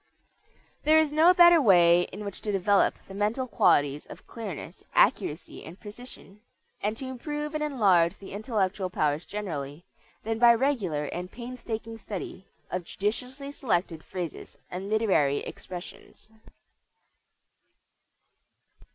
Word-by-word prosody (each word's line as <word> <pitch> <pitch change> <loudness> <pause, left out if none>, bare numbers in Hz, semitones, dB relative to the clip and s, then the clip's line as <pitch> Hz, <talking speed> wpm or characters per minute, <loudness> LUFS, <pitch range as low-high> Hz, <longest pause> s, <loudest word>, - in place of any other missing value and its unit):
There 310 +1 +5
is 310 -2 +3
no 320 +4 +6
better 345 -2 +7
way 175 -6 +5
in 210 +2 -7
which 200 - -7
to 210 - -2
develop 200 +1 +3
the 195 - -11
mental 210 +6 -1
qualities 145 - +2
of - - -12
clearness, 210 -9 -8
accuracy, 155 +4 +1
and 165 +4 -11
precision, 210 -2 -12 0.4
and 215 +2 -1
to 265 - -6
improve 295 +4 -5
and 305 0 -1
enlarge 200 - +3
the 195 - -11
intellectual 200 -3 -1
powers 155 -2 -1
generally, 160 -6 -5 0.4
than 225 0 -2
by 235 0 +7
regular 225 - 0
and 180 +4 -6
painstaking 230 -2 -6
study 195 -1 -7 0.2
of 180 0 -2
judiciously 250 - -4
selected 175 - -1
phrases 175 -4 -7
and 185 +3 -5
literary 195 -11 +2
expressions. 180 +4 -10
205 Hz, 125 wpm, -27 LUFS, 180-250 Hz, 0.4 s, better